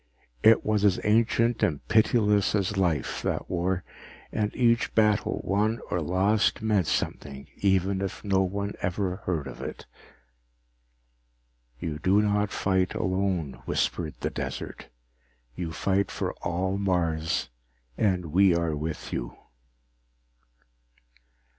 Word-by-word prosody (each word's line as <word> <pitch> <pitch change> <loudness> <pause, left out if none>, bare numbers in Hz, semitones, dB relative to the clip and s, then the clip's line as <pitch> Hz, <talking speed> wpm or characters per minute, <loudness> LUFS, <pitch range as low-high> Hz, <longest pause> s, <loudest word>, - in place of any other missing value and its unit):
It 110 0 +5
was 105 -1 +1
as 100 -3 +4
ancient 115 +2 +2
and 75 -4 0
pitiless 105 -2 +3
as 100 -2 0
life, 85 -8 0
that - - -3
war, 90 +1 0 0.5
and 105 -1 -1
each 115 -1 +2
battle 105 -2 +2
won 105 +4 +1
or 85 - 0
lost 95 +6 +2
meant 105 -6 +2
something 70 -2 -3
even 95 0 +1
if 95 - -4
no 100 -2 +2
one 100 +2 -2
ever 90 0 -1
heard 80 -6 -1
of 65 - -8
it. - - -7 1.9
You 75 -2 -4
do 95 +4 +3
not 105 -1 +1
fight 95 -3 0
alone, 95 -5 -1
whispered 80 -3 -1
the - - -1
desert. - - -6 0.7
_You 85 -2 -4
fight 100 +4 0
for - - -3
all 95 +3 -1
Mars, 85 -7 0 0.4
and 90 - 0
we 95 -1 +5
are 85 -2 0
with 80 +1 -5
you. - - -4
95 Hz, 120 wpm, -27 LUFS, 85-105 Hz, 1.9 s, It